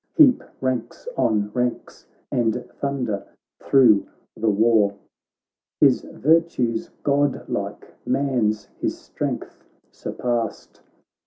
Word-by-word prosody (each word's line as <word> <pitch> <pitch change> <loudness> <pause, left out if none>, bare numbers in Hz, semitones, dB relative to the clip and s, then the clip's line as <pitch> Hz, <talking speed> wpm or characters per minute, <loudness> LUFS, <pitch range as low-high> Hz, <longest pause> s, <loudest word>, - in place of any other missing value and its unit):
Heap 285 -6 +6 0.2
ranks 130 - -3
on 105 -1 +1
ranks, 125 -1 -3 0.2
and 120 0 0
thunder 125 -8 -2 0.4
thro' 120 -7 +5 0.3
the 115 - +1
war; 105 -1 +3 0.8
His - - +5
virtues 150 -7 +1
godlike; 145 0 -1
man's 125 -6 0
his - - -1
strength - - -5 0.3
surpassed. 120 -3 -3
120 Hz, 85 wpm, -23 LUFS, 110-140 Hz, 0.8 s, Heap